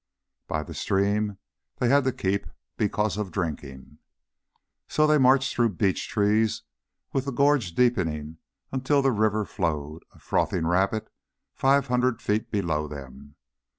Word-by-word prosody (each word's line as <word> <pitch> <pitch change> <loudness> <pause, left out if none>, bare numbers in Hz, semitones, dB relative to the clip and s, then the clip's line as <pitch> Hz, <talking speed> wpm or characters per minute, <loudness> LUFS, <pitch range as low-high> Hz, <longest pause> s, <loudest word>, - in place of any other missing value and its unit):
By 80 -1 -2
the - - -9
stream 100 +1 0 0.4
they 125 - +1
had 140 0 +4
to 130 - +2
keep 100 -2 -2 0.3
because 105 0 0
of 105 -3 -3
drinking. 75 -5 -5 0.9
So 155 - +2
they 150 -1 +4
marched 130 0 +4
through 115 -5 +1
beech 95 0 0
trees, 105 +1 +1 0.5
with 135 -1 0
the 140 - -2
gorge 135 - +2
deepening 80 -11 0 0.3
until 135 +2 +1
the 135 - +3
river 110 -1 +1
flowed, 80 -5 -3
a - - -21
frothing 80 - 0
rapid, 95 +5 0 0.4
five 135 0 +3
hundred 125 -2 +1
feet 105 -1 -1
below 80 -7 -1
them. 70 0 -10
105 Hz, 140 wpm, -26 LUFS, 80-125 Hz, 0.9 s, had